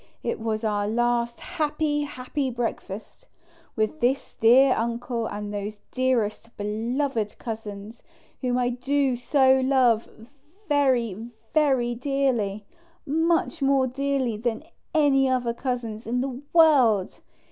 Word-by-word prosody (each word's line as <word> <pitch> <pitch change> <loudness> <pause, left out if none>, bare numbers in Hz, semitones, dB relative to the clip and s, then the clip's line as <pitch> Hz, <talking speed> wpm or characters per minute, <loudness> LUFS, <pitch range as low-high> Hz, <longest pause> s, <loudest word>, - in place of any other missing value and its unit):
It - - -2
was 220 0 -2
our 205 -2 0
last 235 +1 0
happy 300 -3 -1
happy 265 0 -3
breakfast, 230 - -5 0.5
with 220 +8 -1
this 265 +1 0
dear 255 +4 +5
Uncle 235 0 -2
and 205 0 -5
those 205 +1 -4
dearest, 240 -3 -1
beloved 225 +2 -2
Cousins, 220 -1 -7 0.4
whom 250 -2 0
I 245 -1 +1
do 270 +3 0 0.2
love 260 -4 +4
so 225 +1 -17 0.4
vkry 240 -6 +1 0.2
vi:ry 265 -6 +2
dearly; 240 -6 -1 0.4
much 325 +2 +1
more 275 -1 +3
dearly 265 -3 -1
than 225 +3 -2 0.3
any 275 -3 +4
other 245 -2 0
Cousins 235 -4 -4
in 245 +2 0
the 260 -1 -4
world. 265 - +4
245 Hz, 115 wpm, -25 LUFS, 225-275 Hz, 0.5 s, dear